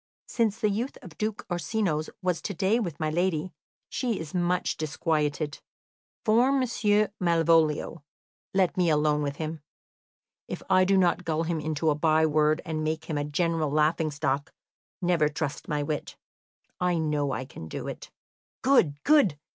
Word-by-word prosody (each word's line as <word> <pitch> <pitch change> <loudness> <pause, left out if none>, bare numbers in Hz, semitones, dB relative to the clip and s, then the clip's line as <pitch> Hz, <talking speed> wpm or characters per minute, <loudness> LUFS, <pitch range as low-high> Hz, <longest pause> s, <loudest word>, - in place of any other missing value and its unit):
"Since 225 -2 0
the 215 - +2
youth 235 +7 -3
of 175 -4 -11
Duke 215 +2 -2
Orsino's 175 -3 -1
was 180 -2 0
to 200 - -4
day 195 +7 +2
with 175 -10 -4
my 155 -1 0
lady, 175 0 0 0.3
she 240 -6 -2
is 160 -2 -7
much 180 0 0
disquieted. 155 -1 -1 0.7
For 235 +4 +4
Monsieur 215 -6 +2
Malvolio, 165 -3 +2 0.5
let 190 -2 +2
me 180 -2 +3
alone 150 -1 +2
with 140 -1 -2
him. 155 0 -5 0.9
If - - -6
I 185 0 +5
do 195 +1 +3
not 180 -1 +2
gull 165 -1 0
him 165 -1 -1
into 155 +1 0
a - - +3
by 155 +1 +3
word 155 +1 +2
and 155 -2 -2
make 160 0 -2
him 155 -2 -3
a - - -1
general 160 +1 0
laughing 155 +2 +2
stock, 145 0 -2 0.5
never 170 -4 +3
trust 150 -1 -4
my 150 -1 -1
wit. 150 0 -4 0.6
I 180 -1 +1
know 150 -3 0
I 130 +1 -3
can 80 - -10
do - - -6
it." - - -7 0.5
"Good, 170 - +3
good! 285 - +4
165 Hz, 160 wpm, -27 LUFS, 150-185 Hz, 0.9 s, I